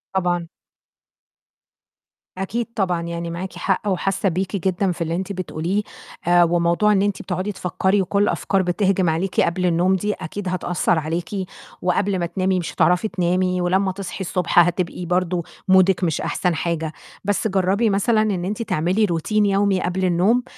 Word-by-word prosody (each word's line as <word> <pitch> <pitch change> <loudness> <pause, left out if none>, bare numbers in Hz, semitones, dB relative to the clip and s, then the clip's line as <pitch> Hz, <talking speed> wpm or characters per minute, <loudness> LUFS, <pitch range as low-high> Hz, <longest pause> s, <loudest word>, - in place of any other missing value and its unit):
طبعًا. 175 -2 0 1.9
أكيد 220 +5 -2
طبعًا 180 -5 0
يعني 170 0 -4
معاكِ 180 +3 -5
حق 195 +1 -1
وحاسّة 195 +1 0
بيكِ 185 +3 -2
جدًا 190 +1 +1
في 175 - -7
اللي 165 0 -1
أنتِ 190 +2 -3
بتقوليه، 185 +1 -2 0.5
آآ، 175 0 +6
وموضوع 170 +4 +2
إن 200 -2 +3
أنتِ 205 -1 -1
بتقعدي 185 +2 -3
تفكّري 190 +1 0
وكلّ 200 +2 +1
الأفكار 195 -1 +1
بتهجم 185 0 +1
عليكِ 170 +4 0
قبل 180 +2 0
النوم 180 +2 +3
دي 210 +3 -1
أكيد 190 +4 -6
هتأثّر 175 -2 0
عليكِ، 165 +3 -3 0.6
وقبل 190 +2 +1
ما 175 - 0
تنامي 185 +2 0
مش 170 - -5
هتعرفي 180 +4 +2
تنامي، 180 -1 0
ولمّا 190 +2 +1
تصحي 190 0 -6
الصبح 180 -1 +1
هتبقي 175 0 +1
برضو 180 0 0 0.2
مودِك 190 0 +4
مش 165 -4 0
أحسن 180 -2 0
حاجة، 165 -1 -2 0.3
بس 205 +2 0
جرّبي 195 +3 +1
مثلًا 210 +3 +2
إن 195 -5 -1
أنتِ 210 +4 -3
تعملي 190 +1 +1
routine 170 +2 -3
يومي 200 -1 +2
قبل 185 +1 -1
النوم، 185 +8 +2
185 Hz, 160 wpm, -21 LUFS, 175-195 Hz, 1.9 s, آآ